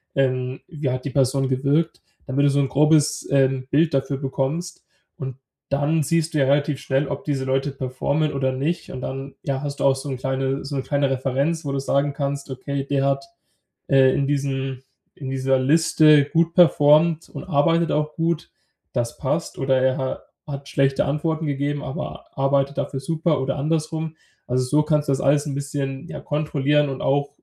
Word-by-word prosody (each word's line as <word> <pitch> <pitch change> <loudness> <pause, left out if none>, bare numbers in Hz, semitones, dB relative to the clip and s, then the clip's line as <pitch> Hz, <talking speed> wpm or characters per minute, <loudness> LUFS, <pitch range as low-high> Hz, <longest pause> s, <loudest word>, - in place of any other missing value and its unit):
Ähm, 130 -1 0
wie 150 -4 -3
hat 130 0 -2
die 140 - -3
Person 135 0 +1
gewirkt“? 145 +5 0 0.2
Damit 140 +2 +1
du 145 - +5
so 140 +1 +2
'n 135 - 0
grobes 150 +1 +3
ähm, 135 -1 +2
Bild 155 +3 +2
dafür 135 0 0
bekommst 140 +6 -3 0.3
und 130 -2 -5 0.3
dann 145 +3 +1
siehst 165 +1 0
du - - 0
ja 135 - +4
relativ 145 +1 +1
schnell, 135 +1 0
ob - - -4
diese 140 -3 -1
Leute 135 +2 0
performen 140 +3 -1
oder 130 -1 0
nicht 150 +7 -2
und 130 - -6
dann, 135 +1 -5
ja, 135 0 -2
hast 145 -1 -5
du - - +1
auch 135 -1 +4
so 135 +2 -7
'n 130 - -3
kleine 135 +1 -2
so 140 +1 -5
'ne 135 - 0
kleine 140 -1 +1
Referenz, 135 +5 0
wo 140 - -2
du 140 - -1
sagen 140 +1 0
kannst: 140 0 -3
„Okay, 135 +1 -4
der 140 -1 +1
hat 140 0 0 0.6
äh, 135 -1 +5
in 140 - +1
diesem 135 -2 -1 0.4
in 135 -3 -7
dieser 135 0 +1
Liste 155 +1 +5
gut 165 +3 +1
performt 160 -1 +5
und - - -8
arbeitet 165 +1 +2
auch 150 0 0
gut, 165 -1 -1 0.4
das 120 -1 -2
passt“, 150 +5 -2
oder: 135 -1 +2
„Er 130 0 +2
ha 130 -1 -2 0.3
hat 140 -1 -7
schlechte 135 0 +2
Antworten 160 +3 -1
gegeben, 145 +1 -2
aber 135 - -6
arbeitet 140 +1 +1
dafür 135 - -2
super 155 0 0
oder 135 +1 -2
andersrum“. 160 +2 -2 0.3
Also 130 +1 +1
so 150 +4 +2
kannst 150 -1 +1
du - - +4
das 135 - -1
alles 145 +2 +3
'n 140 - -3
bisschen, 140 -1 -4
ja, - - -7
kontrollieren 150 -1 +1
und 135 - -5
auch, 140 +1 +1
140 Hz, 190 wpm, -22 LUFS, 135-150 Hz, 0.6 s, du